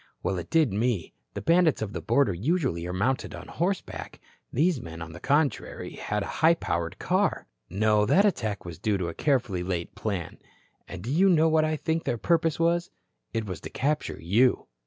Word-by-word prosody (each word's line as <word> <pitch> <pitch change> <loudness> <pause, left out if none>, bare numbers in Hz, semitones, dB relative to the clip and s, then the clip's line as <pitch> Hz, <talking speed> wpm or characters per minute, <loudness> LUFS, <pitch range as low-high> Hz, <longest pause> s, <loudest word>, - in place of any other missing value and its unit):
Well, 95 0 0
it 85 - -8
did 155 -10 +3
me. 110 -4 -1 0.2
The - - -4
bandits 165 -2 +4
of 105 -2 -4
the - - -4
border 115 -3 +2
usually 115 - -1
are - - -3
mounted 115 +9 -1
on - - -9
horseback. 180 +3 -3 0.3
These 155 -1 +2
men, 80 0 -8
on 80 -1 -7
the 85 - -9
contrary, 145 - 0
had 105 -1 -3
a - - -6
high 165 +1 +6
powered 85 - -3
car. - - 0 0.2
No, 105 +2 +2
that 200 - +5
attack 110 - -1
was 85 -2 -8
due 105 +1 +1
to 90 -3 -2
a - - -6
carefully 125 - 0
laid 90 -2 -3
plan. 100 -7 -4 0.5
And 95 -2 -8
do 120 - -3
you 185 +6 +4
know 160 -2 +4
what 155 0 +3
I 155 0 0
think 160 +1 -1
their 120 - 0
purpose 165 +4 +1
was? 170 +1 +2 0.4
It 115 -1 -2
was 95 -3 -6
to - - -7
capture 150 +3 -1
you." 110 +10 +2
120 Hz, 200 wpm, -27 LUFS, -, 0.5 s, high